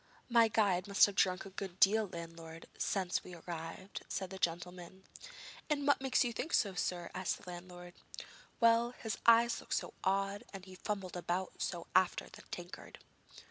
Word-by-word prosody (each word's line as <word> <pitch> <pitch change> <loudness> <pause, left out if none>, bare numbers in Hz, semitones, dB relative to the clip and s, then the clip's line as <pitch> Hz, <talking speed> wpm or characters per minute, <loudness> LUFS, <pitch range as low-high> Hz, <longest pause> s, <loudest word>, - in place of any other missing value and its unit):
'My 235 -1 +6
guide 200 -4 +2
must 200 -1 +7
have 205 - -3
drunk 185 -1 +2
a 195 - -9
good 190 -1 -6
deal, 215 +2 +5
landlord, 165 -1 -8
since 185 -3 0
we 180 - -9
arrived,' 170 +3 -6
then - - -21
said 190 -2 -3
the 190 - -7
gentleman. 180 +2 -3 0.7
'And 290 -2 0
what 285 -1 +4
makes 265 0 +3
you 240 -2 -2
think 315 +9 -4
so, 200 -3 +3
sir?' 180 -1 -2
asked 185 -1 -1
the - - -9
landlord. 175 0 -9 0.7
'Well, 230 +1 +4
his 220 -2 -4
eyes 235 +1 +6
look - - -15
so - - -1
odd, 195 +2 0
and 190 -1 -8
he 185 - -11
fumbled 190 -1 -4
about 175 +2 -3
so 175 -2 -2
after 185 -1 +3
the - - -12
tankard.' 175 0 -8
190 Hz, 180 wpm, -35 LUFS, 175-210 Hz, 0.7 s, must